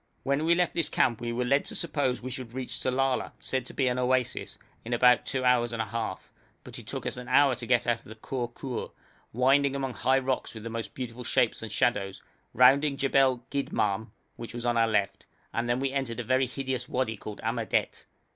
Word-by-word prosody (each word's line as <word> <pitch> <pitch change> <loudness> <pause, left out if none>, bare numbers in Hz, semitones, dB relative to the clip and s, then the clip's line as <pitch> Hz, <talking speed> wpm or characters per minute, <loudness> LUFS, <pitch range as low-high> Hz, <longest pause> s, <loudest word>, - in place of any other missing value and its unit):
When 140 +3 +1
we 170 +1 +5
left 180 0 +1
this 170 - +1
camp 120 -2 +1
we 120 0 -2
were 125 +1 -1
led 140 +3 +3
to - - -4
suppose 140 -7 0
we 130 - -4
should 125 -2 -7
reach 130 -1 -4
Sellala, 130 0 0
said 130 -1 -3
to - - -9
be 135 - +2
an 125 0 0
oasis, 125 0 0 0.3
in 120 - -4
about 125 0 +5
two 130 -1 -1
hours 120 -1 +3
and 115 - -4
a 110 - 0
half; 110 -2 -5 0.3
but - - -8
it - - -13
took - - -4
us - - -2
an 125 0 -7
hour 135 +1 +5
to 120 -1 -5
get 120 0 +3
out 120 -1 +1
of - - -24
the 110 - -10
Khor 120 +2 -4
Khur, 125 0 -5 0.4
winding 135 +3 +3
among 135 -2 -2
high 130 +2 +2
rocks 130 -2 -2
with 110 0 -8
most 115 -2 -5
beautiful 125 -1 -6
shapes 120 -1 +1
and 110 - -6
shadows, 105 -7 0 0.3
rounding 140 +3 +5
Jebel 135 -3 +2
Gidmahm, 110 -6 -1 0.3
which 115 0 -8
was 120 0 -5
on 120 0 +2
our 115 -1 +4
left, 105 -3 -1 0.3
and 120 +1 -1
then 120 +1 +1
we 135 0 0
entered 135 -4 -2
a - - -2
very 130 +2 +2
hideous 130 0 -3
wadi 125 -3 -1
called 105 0 -8
Amadet. 115 0 -1
125 Hz, 220 wpm, -28 LUFS, 115-135 Hz, 0.4 s, we